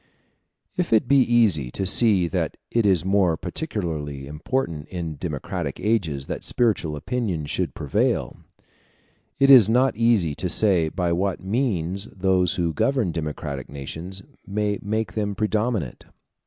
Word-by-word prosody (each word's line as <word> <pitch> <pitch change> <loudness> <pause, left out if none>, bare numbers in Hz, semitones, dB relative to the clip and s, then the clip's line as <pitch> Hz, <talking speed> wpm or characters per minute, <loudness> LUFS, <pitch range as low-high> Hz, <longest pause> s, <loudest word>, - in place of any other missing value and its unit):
If 180 -1 -1
it 110 +2 +3
be 140 +1 +5
easy 110 - +3
to 95 - -1
see 100 -2 +4
that - - -2
it 115 -3 +2
is 90 -4 +2
more 95 -4 +2
particularly 80 - -4
important 75 - -3
in 85 -5 -5
democratic 75 -3 -4
ages 85 -11 0
that - - -5
spiritual 100 -10 0
opinions 85 - -3
should - - -2
prevail, - - 0 1.0
it 135 0 +6
is 120 -6 +9
not 125 +3 +3
easy 110 -9 +2
to 90 +5 -3
say 90 -4 +3
by 90 0 -1
what 95 +2 -1
means 100 -4 -1
those 95 -2 +1
who 85 -2 -1
govern 130 - +1
democratic 75 -4 -5
nations 80 +7 -7 0.2
may 105 +1 -1
make 110 +2 -2
them 105 -2 -2
predominate. 105 - -1
95 Hz, 140 wpm, -23 LUFS, 80-110 Hz, 1.0 s, is